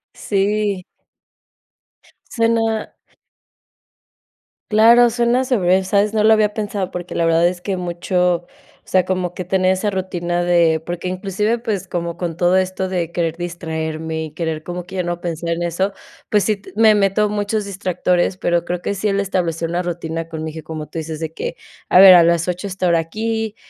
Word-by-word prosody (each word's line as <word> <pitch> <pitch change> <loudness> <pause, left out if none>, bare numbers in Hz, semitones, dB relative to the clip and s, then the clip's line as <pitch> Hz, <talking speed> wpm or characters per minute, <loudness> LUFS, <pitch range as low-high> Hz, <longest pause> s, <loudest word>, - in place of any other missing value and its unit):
Sí. 205 -1 0 1.5
Suena 225 -2 0 1.8
Claro, 235 +3 +6
suena 240 +2 +2
se 255 -1 +1
ve 185 0 +2
¿sabes?, 200 +2 +1
no 215 - +2
lo 220 +1 +6
había 210 -1 +2
pensado 205 -3 -3
porque 180 0 -6
la 170 - 0
verdad 165 +1 +4
es 175 0 -3
que 190 0 -3
mucho 180 0 -1 0.4
o - - -38
sea, 185 -1 +3
como 180 -2 -2
que 185 - -5
tener 185 +1 +2
esa 190 +3 -1
rutina 175 -2 -2
de 170 -2 +3
porque 175 +2 -5
inclusive 195 +5 -1
pues 205 -5 -3
como 170 -1 -4
con 175 -2 -3
todo 175 +1 +3
esto 185 0 -1
de 175 -3 -2
querer 165 -2 -2
distraerme 160 -2 -4
y 155 - -9
querer 160 -1 -4
como 175 +1 -5
que 185 +2 -11
ya 185 - -1
no 175 0 -3
pensar 170 -1 -4
en 170 +1 -2
eso, 185 +4 -1 0.4
pues 210 -2 +3
sí 215 -2 +1
t 200 - -15
me 220 0 +6
meto 205 +1 +2
muchos 205 0 -1
distractores, 185 -2 0
pero 175 -2 0
creo 180 0 -3
que 200 - -2
sí, 200 +2 -1
el 200 -1 +1
establecer 170 -4 -1
una 175 +1 -1
rutina 165 -1 -4
con 160 -1 -6
mi 160 - -3
hijo, 160 0 -9
como 155 -1 -6
tú - - -9
dices 160 -1 -5
de 160 -1 -4
que, - - -4 0.3
a - - +6
ver 190 -1 +11
a 175 - +8
las 170 0 +2
8 180 +2 -3
estar 180 -2 0
aquí, 220 +6 -2
180 Hz, 185 wpm, -19 LUFS, 170-205 Hz, 1.8 s, ver